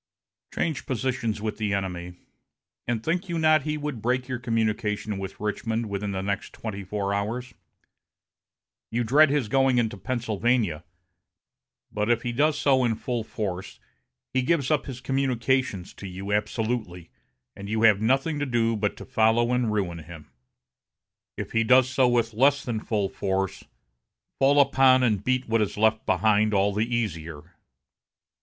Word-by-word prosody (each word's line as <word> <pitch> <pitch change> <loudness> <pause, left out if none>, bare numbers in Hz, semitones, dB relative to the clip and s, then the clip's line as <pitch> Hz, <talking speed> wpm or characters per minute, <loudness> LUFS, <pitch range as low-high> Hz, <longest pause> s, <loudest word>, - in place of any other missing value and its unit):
Change 160 -5 -2
positions 120 -4 -2
with 110 - -3
the 105 -2 0
enemy, 90 -2 -4 0.7
and 115 -2 -1
think 175 +3 -1
you 170 - -1
not 155 -1 +4
he 150 +2 -2
would 145 -6 -4
break 125 +2 0
your 130 -2 -3
communication 110 -3 -1
with 95 0 -7
Richmond 110 +2 -2
within 100 +1 -3
the 95 -1 -3
next 100 0 -3
twenty 100 -3 -6
four 100 +1 -2
hours? 120 +5 -3 1.4
You 120 +2 0
dread 140 +6 +5
his 140 -5 0
going 135 +1 +3
into 115 -4 0
Pennsylvania, 115 -6 -1 1.1
but 105 +1 -1
if 120 -1 +2
he 120 - -2
does 145 +5 +2
so 135 -2 +3
in 115 -2 +1
full 120 0 -3
force, 95 -4 -5 0.5
he 130 - +2
gives 140 +1 +1
up 150 - +1
his 130 -2 -7
communications 130 -6 0
to 100 - -9
you 95 +2 -5
absolutely, 105 -4 -2 0.4
and 100 0 -8
you 110 +1 0
have 105 -3 +5
nothing 135 +7 +1
to 145 - -1
do 115 -2 +1
but 105 -1 -1
to - - -9
follow 115 +2 +2
and 125 -3 +1
ruin 95 -5 -2
him. 80 -1 -12 1.1
If - - -5
he 115 - +2
does 125 +2 +5
so 130 0 +2
with 120 -2 +1
less 135 +5 +3
than 115 -3 -2
full 105 -2 -1
force, 95 -1 -2 0.7
fall 140 +2 +4
upon 135 -2 +5
and 105 -5 +1
beat 130 +2 0
what 115 0 +2
is 105 - -2
left 110 +1 +2
behind 110 -1 +3
all 100 +1 +2
the 110 +4 -1
easier. 85 -8 -4
115 Hz, 160 wpm, -26 LUFS, 105-130 Hz, 1.4 s, dread